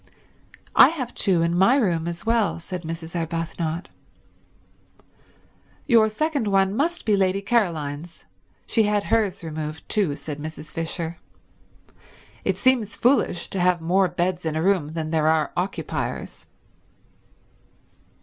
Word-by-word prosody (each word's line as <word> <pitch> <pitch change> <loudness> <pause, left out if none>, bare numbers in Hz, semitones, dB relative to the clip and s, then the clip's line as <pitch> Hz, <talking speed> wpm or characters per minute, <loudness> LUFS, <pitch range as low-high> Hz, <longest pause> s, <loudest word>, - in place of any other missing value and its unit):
"I - - +9
have 265 -7 -4
two 180 -5 +2
in 170 +1 +1
my 195 +8 +5
room 175 - +1
as 170 +3 -5
well," 225 -5 +1
said 180 +1 -6
Mrs. 165 0 -7
Arbuthnot. 165 0 -3 2.0
"Your 230 -5 +5
second 285 +1 -1
one 195 0 +2
must 335 +6 -1
be 210 - +3
Lady 190 0 +2
Caroline's. 170 -8 -1 0.4
She 225 - +2
had 210 -1 +2
hers 200 -5 0
removed 155 -1 -6
too," 190 -9 0
said 150 0 -7
Mrs. 155 0 -8
Fisher. 165 0 -4 1.3
"It - - 0
seems 240 -6 +2
foolish 240 -8 +2
to 195 - -2
have 180 0 +3
more 185 +4 +2
beds 175 +1 -1
in 160 -1 -2
a 160 - 0
room 190 -5 +2
than 160 -1 -3
there 155 -1 +2
are 155 -1 +2
occupiers." 180 +3 -4
180 Hz, 130 wpm, -24 LUFS, 165-210 Hz, 2.0 s, I